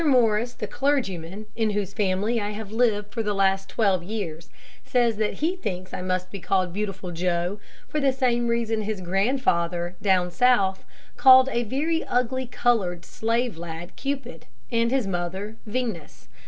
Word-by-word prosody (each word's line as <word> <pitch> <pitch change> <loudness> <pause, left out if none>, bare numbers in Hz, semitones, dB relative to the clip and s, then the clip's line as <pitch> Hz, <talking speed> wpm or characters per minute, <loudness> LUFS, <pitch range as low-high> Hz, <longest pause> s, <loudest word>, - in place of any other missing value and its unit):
Morris, 240 -5 +3
the - - -4
clergyman, 210 - -1
in 220 -2 +1
whose 200 -2 -2
family 210 +3 0
I 205 - -2
have 210 -1 -7
lived 215 -3 +1
for 230 - -1
the 210 -2 -1
last 195 0 +2
twelve 195 -5 +2
years, 175 -4 -5 0.3
says 240 -4 +2
that 215 -1 0
he 335 +5 -1
thinks 185 - -5
I - - -3
must 185 0 -2
be 200 - -6
called 185 -1 0
Beautiful 195 -3 -4
Joe 175 +3 -1 0.3
for 305 - -2
the 275 -2 +3
same 245 -2 +1
reason 230 -1 0
that 215 - -3
his 215 -2 -2
grandfather, 180 -3 0
down 185 -3 +2
South, 195 -3 +3 0.3
called 260 0 +8
a 235 - +1
very 295 +8 0
ugly 255 +1 0
colored 200 -9 0
slave 230 -4 -1
lad 170 +1 -7
Cupid, 275 -2 -5 0.2
and 230 0 +2
his 260 -2 +1
mother 190 +4 -3
Venus. 210 - -4
210 Hz, 165 wpm, -25 LUFS, 185-245 Hz, 0.3 s, called